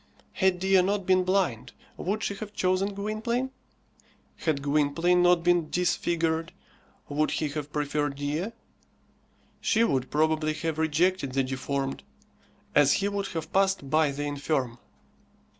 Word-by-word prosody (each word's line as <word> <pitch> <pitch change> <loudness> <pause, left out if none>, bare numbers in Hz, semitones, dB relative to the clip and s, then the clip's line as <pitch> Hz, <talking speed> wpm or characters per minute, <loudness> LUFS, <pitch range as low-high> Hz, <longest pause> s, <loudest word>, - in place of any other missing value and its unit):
Had 190 -2 +2
Dea 190 +1 +4
not 195 +1 0
been 185 0 +4
blind, 170 - 0 0.2
would 210 +4 -2
she - - -1
have 210 0 -7
chosen 190 +1 0
Gwynplaine? 225 +5 -2 0.9
Had 150 -4 -1
Gwynplaine 155 +5 +2
not 175 -1 +4
been 175 -3 +2
disfigured, 165 -2 0 0.5
would 150 +1 0
he 155 - -1
have 150 0 -5
preferred 145 -1 -1
Dea? 145 +6 -2 1.1
She 225 0 +2
would 135 - 0
probably 155 0 +1
have 160 0 -3
rejected 160 -2 +1
the 135 0 +2
deformed, 135 +1 -3 0.7
as 145 -1 +5
he 200 - +1
would 200 -1 -2
have 165 -4 -6
passed 195 -8 +1
by 155 -1 +4
the 140 +1 -4
infirm. 140 -4 -2
160 Hz, 135 wpm, -27 LUFS, 145-190 Hz, 1.1 s, as